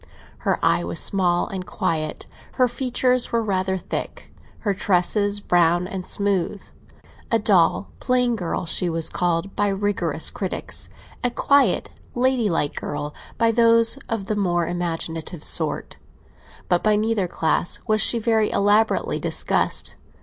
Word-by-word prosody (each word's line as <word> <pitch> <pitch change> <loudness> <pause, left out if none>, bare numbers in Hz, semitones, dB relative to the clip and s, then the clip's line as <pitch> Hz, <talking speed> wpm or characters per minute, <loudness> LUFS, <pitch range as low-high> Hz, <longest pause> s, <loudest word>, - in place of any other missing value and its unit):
Her - - 0
eye - - +2
was - - -2
small 180 -3 +2
and 190 -1 -5
quiet, 165 -5 -3 0.3
her 255 - +3
features 250 0 0
were 230 -1 +1
rather 190 -2 -1
thick, - - -6 0.3
her 205 -3 0
tresses 200 +2 +1
brown 175 -2 +2
and 185 -1 -6
smooth. 200 -1 -1 0.7
A 230 - +3
dull, 200 -3 +2
plain 250 -2 +1
girl 180 -3 -3
she 175 +2 +2
was 165 -1 0
called 175 +2 -1
by 205 - +1
rigorous 195 -5 -1
critics—a 200 +5 -5
quiet, 270 -3 +2 0.2
ladylike 235 - +1
girl 145 0 -5 0.2
by 230 0 +3
those 230 +2 +4
of 225 -4 -2
the 215 - -2
more 175 -4 0
imaginative 165 -1 -3
sort; 155 -3 0 0.7
but 175 -1 +2
by 215 -1 +3
neither 215 -3 0
class 165 +1 -1
was 215 -1 +2
she 235 - +5
very 220 -1 +1
elaborately 205 +2 +2
discussed. - - 0
195 Hz, 135 wpm, -22 LUFS, 175-225 Hz, 0.7 s, she